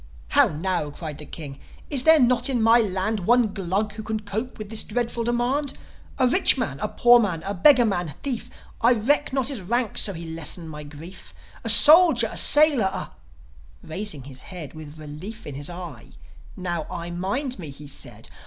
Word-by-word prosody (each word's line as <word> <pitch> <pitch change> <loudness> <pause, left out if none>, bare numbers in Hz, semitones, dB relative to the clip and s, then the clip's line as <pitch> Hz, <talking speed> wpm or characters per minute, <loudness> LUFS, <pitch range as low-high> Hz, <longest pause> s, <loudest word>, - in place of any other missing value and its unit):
"How - - +4
now?" 170 0 -3
cried 150 0 -8
the 150 - -9
King. 140 -4 -9 0.3
"Is 270 -3 +1
there 320 0 +7
not 250 0 +2
in 255 -3 0
my 225 +1 +5
land 205 0 -1
One 225 +2 +2
Glug 200 +2 -2
who 215 - -7
can 220 0 -4
cope 220 +4 -5
with 215 -2 -8
this 220 -1 +3
dreadful 235 +1 -3
demand: 255 +4 -1 0.4
A 255 - +3
rich 360 +10 +3
man, - - -3
a - - -2
poor 240 0 +5
man, 180 -8 -2
a 200 - -4
beggar 245 +6 +5
man, 175 -8 -2
thief 260 -5 -3 0.3
I 235 +2 +5
reck 280 +7 0
not 265 -1 -1
his 265 -8 -4
rank 235 +5 -1
so 200 - +2
he 170 -1 -8
lessen 165 +1 -2
my 150 -1 -8
grief 155 +5 -12 0.3
A - - -2
soldier, 305 -8 +7
a - - -5
sailor, 295 -7 +5
a - - -6 0.4
" - - -26
Raising 160 -6 -4
his 130 -1 -10
head, 170 -7 -9
With 155 -1 -11
relief 155 +9 -9
in 145 - -7
his 145 +3 -5
eye, 175 -8 -9 0.5
"Now, 175 -4 -4
I 170 0 -6
mind 200 +9 -3
me!" 160 -5 -7
he 140 +2 -10
said. 140 - -8
200 Hz, 195 wpm, -23 LUFS, 160-240 Hz, 0.5 s, there